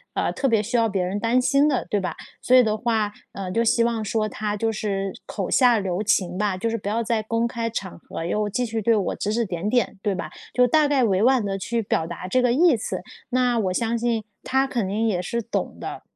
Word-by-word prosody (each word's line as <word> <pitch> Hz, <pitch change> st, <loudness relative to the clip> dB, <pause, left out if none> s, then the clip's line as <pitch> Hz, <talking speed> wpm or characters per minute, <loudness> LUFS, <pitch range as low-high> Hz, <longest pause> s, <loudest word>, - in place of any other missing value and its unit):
呃， -, -, 0 dB
特 275 Hz, -, -1 dB
别 220 Hz, -2 st, +2 dB
需 235 Hz, +4 st, -3 dB
要 230 Hz, -1 st, +3 dB
别 195 Hz, -2 st, 0 dB
人 190 Hz, +3 st, -2 dB
担 230 Hz, +3 st, +2 dB
心 275 Hz, +3 st, +3 dB
的 275 Hz, -4 st, 0 dB
对 205 Hz, -, +2 dB
吧？ 185 Hz, -, -3 dB, 0.3 s
所 255 Hz, -, +4 dB
以 250 Hz, -, +7 dB
的 215 Hz, -2 st, +1 dB
话， 220 Hz, -2 st, 0 dB, 0.2 s
呃， 190 Hz, -2 st, -5 dB
就 230 Hz, +5 st, +1 dB
希 230 Hz, 0 st, +3 dB
望 230 Hz, -2 st, 0 dB
说 215 Hz, +1 st, 0 dB
她 210 Hz, -1 st, -3 dB
就 225 Hz, +2 st, 0 dB
是 195 Hz, -3 st, -2 dB
口 195 Hz, -4 st, -3 dB
下 245 Hz, -3 st, +5 dB
留 190 Hz, -1 st, -2 dB
情 185 Hz, -3 st, +1 dB
吧， 205 Hz, -3 st, 0 dB
就 230 Hz, +5 st, -1 dB
是 -, -, -1 dB
不 200 Hz, -, -7 dB
要 230 Hz, +2 st, 0 dB
在 225 Hz, 0 st, 0 dB
公 230 Hz, +2 st, 0 dB
开 230 Hz, -1 st, -3 dB
场 195 Hz, -6 st, -5 dB
合 165 Hz, -, -6 dB
又 210 Hz, +4 st, 0 dB
继 245 Hz, +5 st, -1 dB
续 225 Hz, -1 st, -3 dB
对 230 Hz, +2 st, +3 dB
我 200 Hz, -4 st, -1 dB
指 205 Hz, -, -2 dB
指 235 Hz, +1 st, +1 dB
点 185 Hz, +1 st, -3 dB
点， 240 Hz, -4 st, +1 dB
对 200 Hz, -2 st, 0 dB
吧？ 180 Hz, -, -5 dB, 0.2 s
就 250 Hz, -, +5 dB
大 300 Hz, +3 st, +4 dB
概 280 Hz, -3 st, +2 dB
委 195 Hz, -4 st, +2 dB
婉 255 Hz, -2 st, +4 dB
地 195 Hz, -1 st, -2 dB
去 230 Hz, +4 st, -1 dB
表 160 Hz, -5 st, 0 dB
达 175 Hz, +2 st, -6 dB
这 255 Hz, +7 st, +2 dB
个 250 Hz, -1 st, +3 dB
意 325 Hz, +1 st, +5 dB
思， 220 Hz, -, -4 dB, 0.3 s
那， 250 Hz, -2 st, +2 dB
我 190 Hz, -4 st, 0 dB
相 230 Hz, +3 st, 0 dB
信 230 Hz, -1 st, 0 dB, 0.2 s
她 265 Hz, +1 st, +2 dB
肯 235 Hz, -7 st, -2 dB
定 215 Hz, +4 st, -1 dB
也 185 Hz, -5 st, 0 dB
是 235 Hz, +6 st, -2 dB
懂 230 Hz, +1 st, -3 dB
的。 -, -, -6 dB
220 Hz, 270 characters per minute, -23 LUFS, 200-235 Hz, 0.3 s, 以